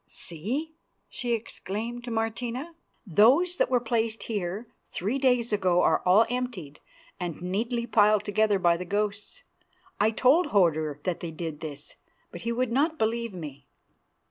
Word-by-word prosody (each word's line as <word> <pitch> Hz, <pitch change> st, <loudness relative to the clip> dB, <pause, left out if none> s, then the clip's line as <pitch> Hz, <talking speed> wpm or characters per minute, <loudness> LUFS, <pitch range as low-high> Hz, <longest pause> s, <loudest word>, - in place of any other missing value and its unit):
"See!" 245 Hz, -, -4 dB, 0.4 s
she 240 Hz, -2 st, -2 dB
exclaimed 230 Hz, +1 st, -4 dB
to -, -, -5 dB
Martina, 235 Hz, +7 st, -3 dB, 0.3 s
"those 255 Hz, -, +4 dB
that -, -, +2 dB
were 250 Hz, -1 st, +3 dB
placed 225 Hz, -1 st, -1 dB
here 205 Hz, 0 st, -3 dB, 0.2 s
three 215 Hz, +9 st, -2 dB
days 245 Hz, -4 st, +2 dB
ago 185 Hz, -3 st, +3 dB
are -, -, +3 dB
all 200 Hz, +5 st, +6 dB
emptied 240 Hz, -, -4 dB, 0.4 s
and 175 Hz, -3 st, -4 dB
neatly 230 Hz, +7 st, -2 dB
piled 210 Hz, -2 st, +4 dB
together 210 Hz, 0 st, +2 dB
by 175 Hz, -2 st, +3 dB
the 180 Hz, -, -4 dB
ghosts. 205 Hz, +1 st, -3 dB, 0.6 s
I 210 Hz, -, +4 dB
told 270 Hz, +9 st, +4 dB
Hodur 160 Hz, -, +2 dB
that 180 Hz, -3 st, -1 dB
they 170 Hz, -, -5 dB
did 160 Hz, -2 st, -5 dB
this, 150 Hz, -2 st, -6 dB, 0.3 s
but 175 Hz, -, -8 dB
he 230 Hz, -, -2 dB
would 240 Hz, 0 st, 0 dB
not 305 Hz, +6 st, +1 dB
believe 230 Hz, -3 st, -1 dB
me. 145 Hz, -5 st, -8 dB
215 Hz, 150 wpm, -27 LUFS, 180-240 Hz, 0.6 s, all